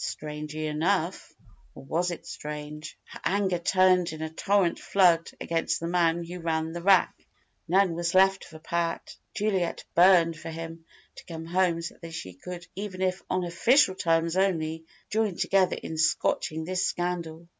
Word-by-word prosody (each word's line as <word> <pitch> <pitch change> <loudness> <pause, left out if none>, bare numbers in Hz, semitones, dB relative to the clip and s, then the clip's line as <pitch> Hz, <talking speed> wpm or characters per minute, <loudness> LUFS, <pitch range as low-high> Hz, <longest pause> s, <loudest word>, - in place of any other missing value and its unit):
Strangely 150 +1 -5
enough 165 +4 -1 0.4
or 135 - -11
was 170 +6 -1
it 175 - -6
strange? 150 0 -7
her - - -11
anger 190 -3 +1
turned 185 0 +3
in 155 0 -6
a 160 - -4
torrent 195 +1 +1
flood 175 -4 +3
against 165 -1 -1
the 165 - -5
man 170 -1 +1
who 175 +2 -7
ran 160 -1 -1
the 170 +1 -6
rag. 190 0 +5 0.6
None 190 0 +3
was 170 +1 -2
left 190 0 +4
for 160 - -12
Pat. 170 +1 -3 0.2
Juliet 195 -5 -1
burned 175 -2 +5
for 165 - -8
him 165 0 -7 0.3
to - - -11
come 165 -2 -7
home 170 -1 +1
so 170 - -5
that - - -25
they 165 - -7
could 175 - -8
even 190 -1 -4
if 185 0 0
"on 185 0 0
official 230 +6 +3
terms 165 -1 +1
only" 165 -4 0 0.3
join 215 -3 +1
together 190 0 +2
in 160 - -5
scotching 160 0 +1
this 185 +2 -1
scandal. 170 -2 -3
170 Hz, 165 wpm, -27 LUFS, 160-185 Hz, 0.6 s, rag